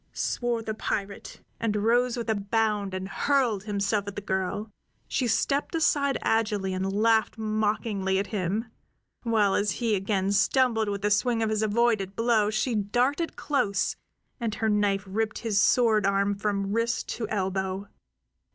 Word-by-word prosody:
swore 240 -2 -1
the 220 - -3
pirate, 200 -2 -4 0.2
and 225 -2 -1
rose 235 +4 +2
with 235 - -4
a 220 - +2
bound 210 -1 0
and 185 0 -4
hurled 240 -4 +1
himself 205 0 -1
at 200 - -6
the - - -3
girl. 195 +2 -2 0.4
She 255 - 0
stepped 275 +8 0
aside 280 -4 +2
agilely 210 -4 0
and 190 +1 -2
laughed 220 +2 +2
mockingly 215 -2 0
at 195 - 0
him, 200 +3 -1 0.6
while 215 -4 +2
as 205 -1 +1
he 230 -3 -1
again 195 0 0
stumbled 225 +1 +2
with 200 -1 -4
the 210 - +1
swing 225 +2 +2
of 220 - 0
his 215 0 0
avoided 215 -3 +1
blow 230 -3 +2
she 215 +3 0
darted 245 - 0
close, 205 -10 0 0.4
and 225 -3 -2
her 220 - 0
knife 205 -2 +1
ripped 215 +3 -2
his 210 -4 +1
sword 220 -5 +3
arm 200 +1 +2
from 200 -1 -2
wrist 230 +1 0
to 230 - -4
elbow. 190 -1 -2
215 Hz, 160 wpm, -27 LUFS, 200-230 Hz, 0.6 s, sword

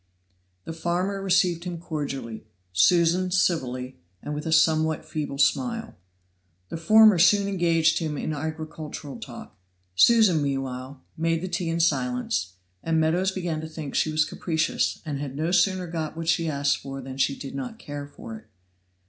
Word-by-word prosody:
The 165 - -6
farmer 180 +4 -1
received 180 -3 +2
him 175 -1 -5
cordially 140 -9 -5 0.3
Susan 170 - +4
civilly, 130 - 0 0.2
and 150 - -4
with 150 +2 -4
a - - -1
somewhat 160 -1 +3
feeble 150 -3 -4
smile. 230 - +1 0.8
The - - -4
former 215 +3 +6
soon 200 +3 +5
engaged 170 -4 +2
him 155 -3 -3
in 155 - -3
agricultural 155 -1 -6
talk. - - -10 0.4
Susan, 205 - +5
meanwhile, 135 -1 -4
made 165 +1 0
the - - -2
tea 175 -1 -2
in 165 0 -1
silence, 125 - 0 0.3
and 160 -1 +1
Meadows 170 +4 +2
began 175 -5 -3
to 160 - -7
think 155 -3 -7
she 155 - +1
was 155 0 +2
capricious, 160 0 -1
and 145 -3 -3
had 140 -2 -5
no 160 +4 -1
sooner 185 0 +2
got 165 -2 -4
what 165 -1 -5
she 165 -1 +2
asked 140 -1 +1
for 135 0 -7
than 135 0 -8
she 135 +1 +1
did 135 - -7
not 135 -2 -5
care 145 -1 -7
for 115 -5 -10
it. 110 - -24
160 Hz, 165 wpm, -25 LUFS, 140-175 Hz, 0.8 s, former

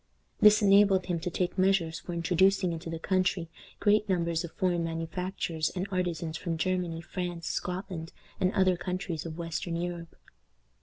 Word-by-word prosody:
This 210 +1 +7
enabled 195 -2 +5
him 175 -2 -1
to 175 +2 -3
take 180 +2 -2
measures 180 -4 +2
for 175 +3 -7
introducing 180 +2 +2
into 165 0 -6
the 165 - -3
country 185 -1 0 0.3
great 210 0 +3
numbers 170 -3 +1
of 170 - -6
foreign 175 -2 0
manufacturers 165 0 -2
and 185 +2 -2
artisans 170 -3 -2
from 165 -1 -3
Germany, 180 -1 -1
France, 175 -1 -5
Scotland, 180 -2 -4 0.3
and 185 0 +2
other 190 -2 +3
countries 180 -3 -4
of 160 0 -7
western 165 0 -3
Europe. 170 -1 -4
175 Hz, 155 wpm, -29 LUFS, 165-185 Hz, 0.3 s, This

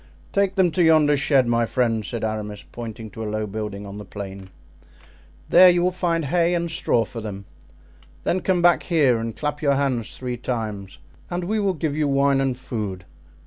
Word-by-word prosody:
"Take 200 -1 +1
them 185 -3 +3
to 175 +3 +2
yonder 155 -2 +5
shed, 140 -2 +3
my 120 0 +1
friend," 115 -3 0
said 110 +3 -5
Aramis, 105 -2 -4
pointing 115 -2 -7
to 110 - -8
a 105 - -3
low 110 0 -2
building 105 -1 -5
on 100 +1 -8
the - - -7
plain; 95 -1 -8 1.0
"there 180 +1 +8
you 175 0 +3
will 180 - +2
find 170 -3 -1
hay 170 +4 +2
and 170 -1 -2
straw 120 -7 +1
for 115 - -8
them; 100 -2 -7 0.8
then 185 - +1
come 185 -2 0
back 175 0 +5
here 140 -9 +2
and 115 -1 -5
clap 150 0 -3
your 140 -2 +3
hands 130 -5 -1
three 125 -1 -4
times, 110 -6 -4 0.3
and 175 0 -3
we 215 +5 -1
will 200 -2 +1
give 155 -2 -2
you 150 -1 +1
wine 140 0 +2
and 130 -2 -1
food. 105 -8 -5
130 Hz, 195 wpm, -23 LUFS, 110-165 Hz, 1.0 s, there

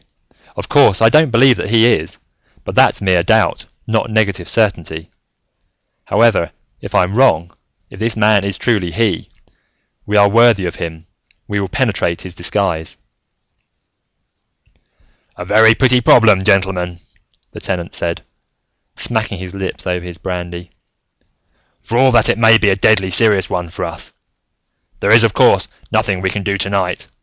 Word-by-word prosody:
Of - - -7
course, 95 - +3
I 115 - +5
don't 155 +4 +3
believe 125 +1 +4
that - - -5
he 115 0 +3
is, 80 0 -4 0.5
but - - -7
that's - - +2
mere 90 -2 +2
doubt, 110 +4 0 0.2
not 110 +1 -2
negative 100 -5 -1
certainty. 85 -8 -1 0.9
However, 110 -7 +1 0.3
if - - -8
I'm 90 +2 +1
wrong, 85 -10 +1 0.4
if - - -13
this 110 0 -2
man 105 -2 +2
is 100 -1 -4
truly 100 -8 -1
He, 110 +2 -2 0.8
we 105 0 0
are 100 0 +5
worthy 115 -2 +3
of 85 - -5
him, 80 0 -7 0.4
we 100 -1 -3
will 100 - -3
penetrate 95 -5 -2
his 90 - -8
disguise." 85 -2 -3 2.4
"A - - -7
very 110 +1 +4
pretty 125 -1 +2
problem, 110 -5 +4
gentlemen," 95 -3 0 0.5
the - - -11
Tenant 90 -2 -5
said, 85 0 -4 0.7
smacking 110 -4 -2
his 90 0 -8
lips 95 -1 -6
over 90 -1 -3
his 90 -1 -9
brandy, 90 -1 -7 1.1
"for 115 - -1
all 130 0 +4
that 120 - +3
it - - 0
may 115 0 +6
be 110 -2 +1
a - - +1
deadly 95 -1 +1
serious 105 0 +2
one 90 -1 -3
for 85 - -6
us. - - -9 0.9
There - - 0
is, - - +6
of - - +1
course, - - +3 0.2
nothing 95 -2 -1
we 95 0 -1
can 105 - -4
do 100 0 -2
tonight. 100 -2 -2
100 Hz, 155 wpm, -15 LUFS, 90-110 Hz, 2.4 s, may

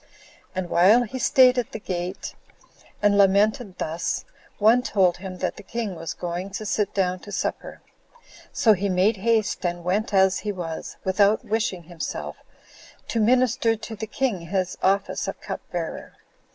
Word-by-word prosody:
And 185 -1 -2
while 200 +9 +5
he 250 +3 -6
staid 255 -1 +5
at 245 +2 -4
the - - -4
gate, 180 -1 -4 0.7
and 205 -1 +4
lamented 200 +1 +3
thus, 165 +2 -2 0.3
one 225 +4 +5
told 190 -7 +2
him 185 0 -7
that - - -3
the - - -8
king 215 0 -4
was 165 -1 -6
going 175 +2 -4
to 215 - -7
sit 205 0 0
down 185 -2 +1
to 205 - -11
supper; - - -4 0.7
so 220 - +4
he 200 +1 -1
made 190 +4 +2
haste, 220 +1 +1
and 175 -1 -2
went 200 +6 0
as 190 -1 +4
he 210 - -3
was, 170 -4 -6
without 200 +3 +2
wishing 210 -5 -1
himself, 170 0 -6 0.7
to 230 - 0
minister 240 0 +3
to 220 +1 -8
the 220 +1 -5
king 225 -5 -1
in 170 - -10
his 185 0 -1
office 195 +1 +1
of - - -5
cup - - -6
bearer. - - -5
200 Hz, 165 wpm, -24 LUFS, 185-220 Hz, 0.7 s, while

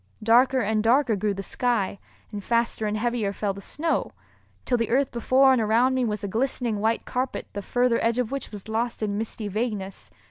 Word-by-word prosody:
Darker 250 +4 +4
and 215 0 +1
darker 240 +1 +3
grew 205 +1 -1
the 195 - -5
sky, 210 -4 -1 0.3
and 205 -1 -6
faster 230 -1 0
and 210 +1 -1
heavier 230 -2 -1
fell 200 0 -2
the 200 - -9
snow, 320 +10 -2 0.5
till 250 - +1
the 230 -2 0
earth 265 +2 +2
before 260 +3 +4
and 250 - +2
around 230 +4 +3
me 260 -1 +1
was 210 -3 -2
a - - -1
glistening 230 0 -1
white 225 +2 0
carpet 255 +1 -3
the 205 - -4
further 245 +3 +1
edge 230 +1 +1
of 250 -2 -1
which 275 0 -4
was 205 -1 -10
lost 225 +1 -2
in 205 -1 -1
misty 220 -1 -4
vagueness. 205 -2 -3
230 Hz, 205 wpm, -25 LUFS, 210-250 Hz, 0.5 s, Darker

